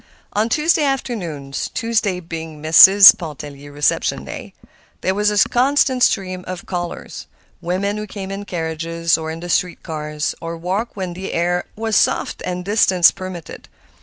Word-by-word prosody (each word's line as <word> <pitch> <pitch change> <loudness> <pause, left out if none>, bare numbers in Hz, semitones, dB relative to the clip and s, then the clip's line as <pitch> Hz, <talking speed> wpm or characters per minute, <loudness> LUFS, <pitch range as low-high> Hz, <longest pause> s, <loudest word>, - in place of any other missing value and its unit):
On 215 +3 0
Tuesday 305 +4 +2
afternoons—Tuesday 210 - -2
being 160 -2 -7
Mrs. 190 +7 +9
Pontellier's 145 -5 -9
reception 145 -1 0
day—there 190 - -7
was 210 +1 +1
a 210 -1 +3
constant 260 0 +2
stream 185 -5 +1
of 185 -1 -6
callers—women 180 +2 -5
who 210 0 -5
came 195 -1 -7
in 200 +1 -6
carriages 165 -1 -1
or 160 0 -4
in 160 +1 -6
the 175 - -6
street 175 +1 -1
cars, 150 -1 -4
or 165 0 -5
walked 190 +7 -3
when 185 -3 -4
the 190 +2 -6
air 175 +1 0
was 220 0 -2
soft - - +1
and 180 0 -4
distance 190 -4 +4
permitted. 185 -4 -9
180 Hz, 140 wpm, -19 LUFS, 165-205 Hz, -, Mrs